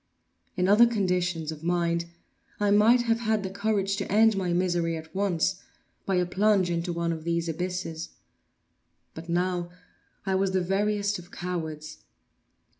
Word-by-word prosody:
In 180 0 +2
other 215 +4 +7
conditions 180 -7 -1
of 155 0 -9
mind 170 -1 0 0.5
I 205 -1 +2
might 225 +4 +5
have 230 -1 +1
had 220 -3 0
courage 200 -1 0
to 200 - -4
end 220 +1 +5
my 185 -2 -1
misery 175 -2 0
at 160 0 -11
once 190 -1 0 0.5
by 195 - +1
a 180 0 +2
plunge 195 0 +2
into 170 +1 -1
one 170 0 -1
of 160 -1 -7
these 170 0 -1
abysses; 165 -1 -4 1.0
but 165 +2 -10
now 175 0 0 0.6
I 190 - 0
was 190 0 +1
the 185 - +2
veriest 205 +2 0
of 175 0 -13
cowards. 160 -4 -5
180 Hz, 150 wpm, -27 LUFS, 170-200 Hz, 1.0 s, other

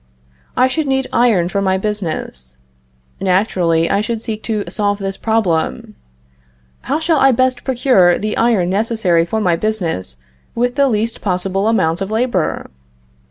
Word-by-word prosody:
I 255 - +5
should 300 +3 -2
need 265 -1 0
iron 225 -8 +3
for 200 +2 -1
my 190 -1 +1
business. 160 - -4 0.6
Naturally 180 -4 +1
I 200 - +1
should 230 +1 -3
seek 220 -1 -5
to 215 -2 0
solve 205 +2 -1
this 195 -1 -4
problem: 220 +1 -1 1.0
"How 285 - +2
shall 320 -1 +1
I 270 - +5
best 255 0 +1
procure 245 -9 +3
the 215 0 -3
iron 215 -7 +2
necessary 200 -5 +1
for 220 +6 -2
my 180 -5 +2
business 165 - -2 0.4
with 245 +1 0
the 280 0 +2
least 225 0 -2
possible 195 +1 -1
amount 170 -6 +1
of 195 - -2
labor?" 220 - -1
210 Hz, 150 wpm, -17 LUFS, 180-235 Hz, 1.0 s, I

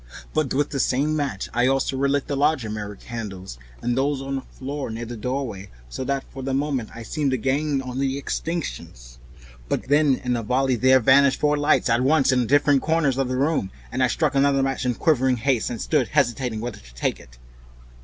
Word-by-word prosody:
But 155 -4 0
with 145 +2 0
the 140 - -2
same 140 +5 +1
match 140 -10 -2
I 120 +1 +3
also 135 0 +1
relit 140 +1 +1
the 145 - -3
larger 140 -6 +1
mirror 105 -1 -5
candles, 95 - -7 0.2
and 120 0 0
those 140 +1 0
on 135 0 -5
the - - -4
floor 135 +1 -6
near 115 +1 -5
the 120 +1 -6
doorway, 115 -5 -4 0.2
so 130 - -5
that 140 0 -1
for 135 - -8
the 130 0 -2
moment 135 -5 -1
I 115 - -7
seemed 145 +4 -1
to 130 - +1
gain 135 +3 0
on 130 0 -5
the 135 0 0
extinctions. 60 - -5 0.5
But - - -2
then 145 -1 +4
in 125 - -4
a - - -1
noiseless 105 - -10
volley 130 0 +2
there 130 +3 +5
vanished 135 +2 +5
four 150 0 +2
lights 145 -3 +2
at 120 0 +2
once 140 0 +3
in 125 -2 +1
different 145 0 +4
corners 155 -5 +1
of 135 - +1
the 130 0 -2
room, 140 -8 +1 0.2
and 130 - -2
I 130 - +5
struck 155 +4 0
another 140 0 +3
match 135 -1 -1
in 125 - 0
quivering 130 -4 +2
haste, 125 0 0
and 120 - -5
stood - - +1
hesitating 120 -2 0
whither 120 -2 -5
to - - -17
take - - -1
it. - - -17
130 Hz, 215 wpm, -23 LUFS, 120-140 Hz, 0.5 s, there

